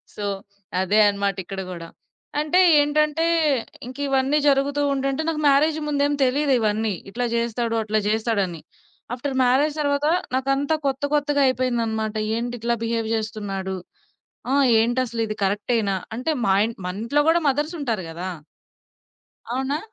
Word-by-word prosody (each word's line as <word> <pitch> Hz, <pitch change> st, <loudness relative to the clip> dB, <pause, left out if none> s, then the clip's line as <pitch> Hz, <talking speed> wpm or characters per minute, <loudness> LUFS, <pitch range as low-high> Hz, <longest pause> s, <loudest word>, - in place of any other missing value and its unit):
So, 205 Hz, -, -4 dB, 0.6 s
అదే 205 Hz, +3 st, +2 dB
అన్నమాట 200 Hz, -1 st, 0 dB
ఇక్కడ 195 Hz, +1 st, -6 dB
గూడా. 170 Hz, -2 st, -7 dB, 0.5 s
అంటె, 305 Hz, +5 st, +3 dB, 0.2 s
ఏంటంటే 305 Hz, +2 st, +1 dB, 0.6 s
ఇంకివన్నీ 275 Hz, +1 st, 0 dB
జరుగుతూ 280 Hz, +1 st, +2 dB
ఉంటుంటే 275 Hz, +2 st, -1 dB
నాకు 310 Hz, -2 st, -2 dB
మ్యారేజ్ 300 Hz, +3 st, +3 dB
ముందేమి 285 Hz, 0 st, +1 dB
తెలిదివన్నీ. 235 Hz, -6 st, +1 dB, 0.2 s
ఇట్లా 245 Hz, +4 st, -2 dB
జేస్తాడు, 235 Hz, 0 st, -1 dB
అట్లా 215 Hz, 0 st, +1 dB
జేస్తాడని 210 Hz, -6 st, 0 dB, 0.5 s
ఆఫ్టర్ 270 Hz, +2 st, -4 dB
మ్యారేజ్ 280 Hz, +5 st, +2 dB
తరువాత 285 Hz, 0 st, 0 dB, 0.3 s
నాకంతా 275 Hz, +3 st, +1 dB
కొత్త 270 Hz, +1 st, -2 dB
కొత్తగా 290 Hz, -1 st, +1 dB
అయిపోయిందన్నమాట. 230 Hz, -4 st, -1 dB, 0.2 s
ఏంటిట్లా 235 Hz, 0 st, -2 dB
బిహేవ్ 225 Hz, -1 st, -1 dB
జేస్తున్నాడు. 205 Hz, -3 st, -4 dB, 0.8 s
ఆహ్, 280 Hz, -1 st, +4 dB
ఏంటసలిది 230 Hz, -2 st, -1 dB
కరెక్టెనా 205 Hz, 0 st, 0 dB, 0.2 s
అంటే 255 Hz, +7 st, -1 dB
మాయి 195 Hz, +3 st, +3 dB, 0.2 s
మన 180 Hz, -, -3 dB
ఇంట్లో 285 Hz, +5 st, +2 dB
కూడా 340 Hz, +1 st, +3 dB
మదర్సుంటారు 280 Hz, -, -1 dB
గదా! 175 Hz, +3 st, -5 dB, 1.2 s
అవునా? 265 Hz, +3 st, -1 dB
245 Hz, 115 wpm, -23 LUFS, 215-285 Hz, 1.2 s, ఆహ్